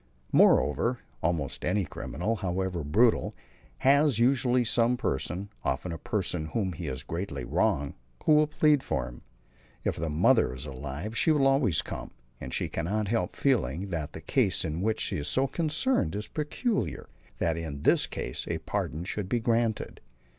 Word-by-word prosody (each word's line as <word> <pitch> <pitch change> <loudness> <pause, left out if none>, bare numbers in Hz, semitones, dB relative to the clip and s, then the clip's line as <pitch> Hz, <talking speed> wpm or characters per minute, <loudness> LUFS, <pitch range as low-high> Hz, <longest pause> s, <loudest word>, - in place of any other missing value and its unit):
Moreover, 120 - +4 0.2
almost 80 -5 -1
any 95 +1 +1
criminal, 90 +8 -3
however 95 -3 -2
brutal, 110 +11 +2 0.4
has 140 - +4
usually 125 0 +3
some 120 +2 +2
person, 90 - -2
often 90 - -1
a 80 - -5
person 90 -6 -1
whom 95 0 -1
he 80 0 -6
has 65 -2 -4
greatly 85 -7 -4
wronged, 70 +3 +1 0.3
who - - +3
will 150 0 +5
plead 150 -1 +3
for - - -2
him. - - -11 0.6
If - - -1
the 80 0 -2
mother 75 -4 +3
is 65 +3 -6
alive 75 - -6
she 160 - +2
will 150 -3 +4
always 135 - +3
come, - - -6 0.3
and 65 - -7
she - - -1
cannot 100 +5 -2
help 115 +1 -1
feeling 95 - 0
that 80 -4 -3
the - - -8
case - - +1
in 80 +2 -3
which 110 +2 0
she - - -1
is 75 - -3
so 130 - +3
concerned 155 - 0
is 105 +1 -4
peculiar, 150 - -2 0.3
that 80 +4 +1
in 80 -4 -5
this - - +4
case - - -5
a - - -1
pardon 80 +4 -3
should 95 +1 -4
be 120 - +1
granted. 115 -1 0
95 Hz, 170 wpm, -28 LUFS, 80-125 Hz, 0.6 s, will